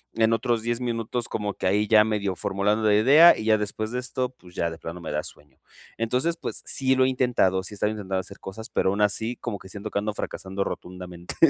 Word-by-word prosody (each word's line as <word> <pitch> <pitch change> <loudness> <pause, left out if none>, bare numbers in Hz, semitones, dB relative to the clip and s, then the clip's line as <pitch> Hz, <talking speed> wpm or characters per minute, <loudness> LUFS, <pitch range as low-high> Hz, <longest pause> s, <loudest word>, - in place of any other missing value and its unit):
en 115 0 +3
otros 115 0 +1
10 120 +1 -2
minutos 120 0 -2
como 105 -1 -2
que - - -6
ahí 105 +3 +2
ya 105 0 +6
medio 105 -3 -1
formulando 100 +4 0
la 105 - +5
idea, 145 +10 +7
y 110 - -5
ya 110 -1 +4
después 110 +1 -3
de 125 - -2
esto, 125 0 -2
pues, 90 -1 -17
ya 85 - 0
de 80 - -8
plano 85 +2 -7
me - - -6
da 75 +1 -1
sueño. 75 -3 -13 0.4
Entonces, 125 +9 0
pues, - - -5
sí 130 -1 +2
lo 130 - +5
he 130 - +3
intentado, 120 -8 +2
sí 105 - -8
estaba 105 +1 0
intentando 95 -3 -3
hacer 100 +1 -9
cosas, 110 +4 -7
pero - - +1
aún 100 +2 -1
así 110 +3 +1
como 115 -4 -4
que 95 - -13
siento 100 +2 -6
que 100 - -1
ando 105 +1 -2
fracasando 95 -1 -4
rotundamente. 90 -1 -6
105 Hz, 235 wpm, -25 LUFS, 95-120 Hz, 0.4 s, idea